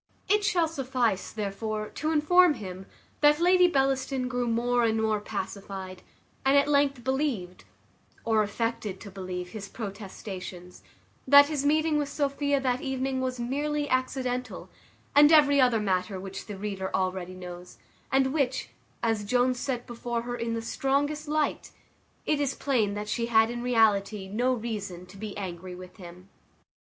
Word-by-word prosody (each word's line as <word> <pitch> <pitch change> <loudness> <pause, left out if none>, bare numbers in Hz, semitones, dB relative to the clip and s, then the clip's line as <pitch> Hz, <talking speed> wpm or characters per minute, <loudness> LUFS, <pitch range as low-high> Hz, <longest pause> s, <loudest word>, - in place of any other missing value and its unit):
It 420 0 +3
shall 355 -5 +2
suffice, 255 - -1
therefore, 215 +1 -3
to 310 - -3
inform 320 +2 +5
him, 190 -4 -8 0.3
that 295 +1 +5
Lady 360 +1 +5
Bellaston 270 -3 0
grew 245 -1 -1
more 240 +1 +1
and 225 -1 +2
more 220 -1 +1
pacified, 195 -2 -6 0.4
and 270 +1 +4
at 280 - +4
length 280 -3 +2
believed, 260 -10 -2 0.6
or 220 -1 +3
affected 210 -2 -2
to 200 - -10
believe, 185 -2 -5
his 200 -2 -8
protestations, 190 -4 -8 0.5
that 285 +2 +8
his 285 -2 0
meeting 310 0 +2
with 290 -1 -2
Sophia 285 -1 0
that 255 -1 0
evening 265 0 -2
was 255 -1 -2
merely 290 +4 -1
accidental, 255 -1 -2 0.4
and 295 +1 +8
every 285 -3 +6
other 245 -3 +4
matter 190 -1 -1
which 195 0 -7
the 205 -2 -6
reader 195 -1 -4
already 185 -1 -2
knows, 180 -1 -9 0.3
and 265 0 +2
which, 265 -4 0 0.3
as 225 -2 +1
Jones 250 +3 +1
set 250 -3 -3
before 240 0 -4
her 245 0 -4
in 230 -1 -2
the 225 - -4
strongest 290 +5 -1
light, 305 0 -1 0.6
it 300 - +1
is 275 -2 0
plain 225 -8 0
that 210 0 -4
she 230 +2 -1
had 225 0 +4
in 240 0 -4
reality 215 -4 +2
no 240 +6 +1
reason 210 -7 -4
to 180 +2 -15
be 210 0 -6
angry 180 -2 -6
with 185 +2 -12
him. 180 0 -12
240 Hz, 155 wpm, -27 LUFS, 200-275 Hz, 0.6 s, that